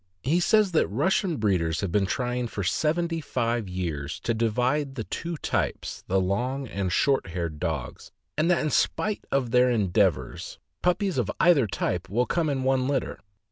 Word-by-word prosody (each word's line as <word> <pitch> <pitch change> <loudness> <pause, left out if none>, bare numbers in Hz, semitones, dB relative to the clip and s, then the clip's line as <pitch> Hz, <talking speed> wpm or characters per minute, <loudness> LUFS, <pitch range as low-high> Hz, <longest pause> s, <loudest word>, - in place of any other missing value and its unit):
He 155 +7 +2
says 210 +2 +3
that 165 - +2
Russian 170 - +1
breeders 90 -7 +1
have 100 -4 -2
been 100 0 +2
trying 125 +2 -1
for 100 -3 -4
seventy 165 - 0
five 115 -6 -1
years 85 -4 -4
to 115 - 0
divide 125 +5 0
the 115 - -3
two 165 +8 -5
types, - - -2
the 95 +1 +2
long 125 +9 -1
and 100 -4 -2
short 135 - +2
haired 85 -3 -4
dogs, - - -4 0.2
and 155 +3 +1
that, 175 - +3
in 155 - 0
spite 215 +8 0
of 130 -4 0
their 125 +1 +5
endeavors, 95 - 0 0.2
puppies 180 -3 +1
of 115 - -1
either 155 -8 +5
type 90 -1 -2
will 120 +6 +1
come 165 +1 0
in 135 -2 -1
one 130 -1 +2
litter. 135 -2 -1
125 Hz, 175 wpm, -26 LUFS, 95-150 Hz, 0.2 s, their